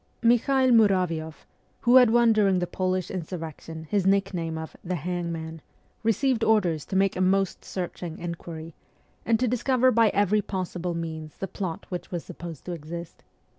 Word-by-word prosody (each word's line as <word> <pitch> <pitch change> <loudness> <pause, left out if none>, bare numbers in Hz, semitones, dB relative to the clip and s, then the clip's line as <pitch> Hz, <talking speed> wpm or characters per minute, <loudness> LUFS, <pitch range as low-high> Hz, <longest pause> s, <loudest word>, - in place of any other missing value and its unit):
Mikhael 255 +3 +4
Muravioff, 180 -8 +2 0.4
who 245 +2 +6
had 250 -3 +7
won 235 0 +5
during 200 -3 +3
the 180 - 0
Polish 185 0 -2
insurrection 165 -2 -6
his 190 +4 0
nickname 180 -5 +1
of 160 0 -7
' - - -39
the 180 +1 -2
Hangman,' 165 -1 -4 0.4
received 230 +1 +1
orders 180 -9 +2
to 190 - -5
make 195 0 +3
a 185 - -1
most 195 0 +1
searching 175 -2 -5
inquiry, 165 -1 -7 0.5
and 225 -1 +3
to 255 - +2
discover 255 +2 +3
by 230 -2 +4
every 205 +1 +2
possible 180 -3 -3
means 160 -2 -6
the 195 - -4
plot 180 -3 -5
which 180 -1 -5
was 175 -2 -4
supposed 170 -4 -9
to 180 - -4
exist. 170 +1 -7
185 Hz, 165 wpm, -26 LUFS, 165-215 Hz, 0.5 s, had